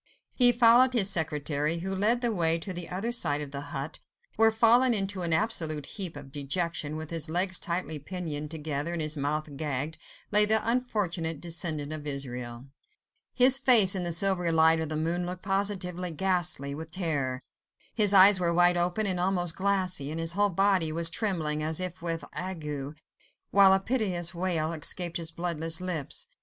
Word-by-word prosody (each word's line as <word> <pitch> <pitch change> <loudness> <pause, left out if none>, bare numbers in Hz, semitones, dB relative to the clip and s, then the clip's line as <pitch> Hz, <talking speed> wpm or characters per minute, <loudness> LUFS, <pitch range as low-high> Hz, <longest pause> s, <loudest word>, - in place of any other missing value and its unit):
He 245 -2 +7
followed 240 +2 +5
his 205 -5 +3
secretary, 150 -2 -1
who 190 +2 -3
led 215 +5 +1
the 240 -2 +1
way 165 -3 +1
to 185 +3 -7
the 175 -1 -7
other 195 +6 -3
side 145 -11 0
of 145 -2 -7
the 140 0 -6
hut, 140 +2 -6 0.4
where, 225 +1 +4
fallen 235 +2 +4
into 195 -2 -2
an 170 -1 -2
absolute 160 -6 -1
heap 185 -3 -5
of 140 -2 -11
dejection, 150 +2 -3
with 155 0 -7
his 165 -1 -2
legs 185 +3 0
tightly 170 -3 -3
pinioned 150 -2 -6
together 155 0 -4
and 170 - -3
his 155 +1 -3
mouth 150 +1 -3
gagged, 150 +1 -3 0.3
lay 210 0 +7
the 220 +1 +2
unfortunate 195 - -2
descendant 160 -3 -3
of 150 -1 -7
Israel. 125 -3 -6 0.7
His 260 +1 +6
face 235 -8 +6
in 185 -2 -2
the 175 - -2
silvery 180 0 +2
light 160 0 +4
of 160 -2 -3
the 155 - -3
moon 170 +3 -2
looked 180 0 -7
positively 195 -2 -2
ghastly 175 -5 0
with 160 +3 -8
terror: 145 -8 -2 0.5
his 210 -3 +3
eyes 195 0 +7
were 170 -1 0
wide 175 +1 +3
open 180 +5 0
and 185 -3 -2
almost 175 -2 -1
glassy, 185 -6 -1
and 160 +2 -5
his 165 0 0
whole 205 +4 +1
body 190 -3 +1
was 165 +1 0
trembling, 160 -8 -1
as 155 +2 -1
if 185 -1 -5
with 165 -3 -3
ague, 150 -6 -5 0.5
while 195 -1 +6
a 190 - +4
piteous 190 -6 -2
wail 170 -3 -2
escaped 170 +2 0
his 165 -2 -2
bloodless 165 -1 -2
lips. 180 -6 -4
170 Hz, 180 wpm, -27 LUFS, 155-195 Hz, 0.7 s, He